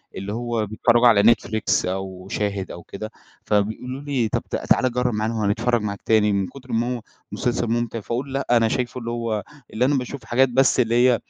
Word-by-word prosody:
اللي 100 +2 -5
هو 120 -2 -1
بيتفرجوا 120 +3 +3
على 105 -3 +6
نتفليكس 110 -1 +2
أو 95 0 -4
شاهد 100 -2 -2
أو 85 -1 -9
كده، 110 +3 -7 0.3
فبيقولوا 110 +6 -1
لي 135 -6 0
طب - - 0 0.3
تعال 130 -1 +4
جرّب 125 -1 0
معانا 110 +2 -1
وهنتفرج 115 +2 +1
معاك 100 -1 -4
تاني 105 -2 +4
من 100 -2 0
كُتر 130 -2 -12
ما 120 +2 0
هو - - -10 0.3
مسلسل 120 -1 -1
ممتع، 115 0 -1
فأقول 130 +6 -4
لأ، 140 - -2
أنا 115 -2 +5
شايفه 125 +2 -2
اللي 115 0 -4
هو 115 -3 -2 0.3
اللي 120 +3 +2
أنا 145 +1 +2
باشوف 125 -1 -5
حاجات 130 +2 +3
بس 130 +1 +3
اللي 115 -1 +2
هي 125 -1 +4
115 Hz, 195 wpm, -23 LUFS, 105-125 Hz, 0.3 s, على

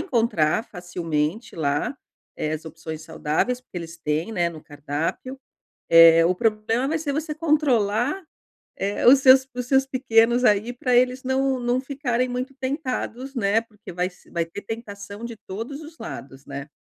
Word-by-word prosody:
encontrar 225 - +1
facilmente 175 +2 -3
lá, 145 - -1 0.4
eh, 155 - -2
as 155 +1 -4
opções 160 -1 -7
saudáveis, 160 +11 -1
porque 190 -8 -8
eles 165 0 -8
têm, 155 +8 -2
né, 175 -5 +1
no 160 -2 -11
cardápio, 150 - -4 0.5
eh, 165 0 +8
o 180 - +3
problema 225 +4 0
vai 320 - 0
ser 300 -3 -2
você 305 +1 -3
controlar, 290 - +1 0.6
eh, 200 +3 0
os 265 +2 +9
seus 260 0 +6
os 250 - -3
seus 270 +1 +3
pequenos 240 -2 +3
aí 215 +1 +3
pra 250 0 -1
eles 255 +1 +3
não 265 0 +1
não 245 +1 +1
ficarem 260 -2 -1
muito 250 +2 -4
tentados, 260 -1 -3
né, 220 -1 +2
porque 215 -5 -13
vai 180 +1 -1
se 180 - -22
vai 170 -1 -1
ter 165 +5 -8
tentação 205 -1 -7
de 235 -1 -6
todos 230 +9 -5
os 315 +1 -12
lados, 135 0 -9
né? 140 +1 -7
225 Hz, 165 wpm, -24 LUFS, 170-260 Hz, 0.6 s, os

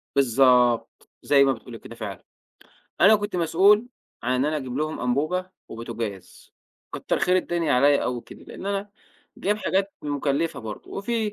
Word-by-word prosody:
بالضبط، 125 -2 +3
زَي 140 -1 +5
ما 135 -1 +3
بتقولي 115 0 -10
كده 115 - -11
فعلًا، 105 -5 -7 0.8
أنا 215 +3 +7
كنت 205 -2 -4
مسؤول 200 +7 +4 0.3
عن 125 +2 +1
أنا 155 +1 0
أجيب 130 -4 -5
لهم 155 +1 -2
أنبوبة، 155 +9 -1 0.2
وبوتاجاز، 115 -4 -7 0.4
كَتر - - -2
خير 180 +1 +2
الدنيا 170 -4 0
عليّا 140 +3 +4
أوي 125 -1 -2
كده، - - -14
لأن 195 - -9
أنا 200 0 -2 0.5
جايب 205 +2 0
حاجات 195 -1 -1
مُكلفة 145 +2 -1
برضه، 110 -2 -8
وفي 215 +1 -2
145 Hz, 150 wpm, -24 LUFS, 125-190 Hz, 0.8 s, أنا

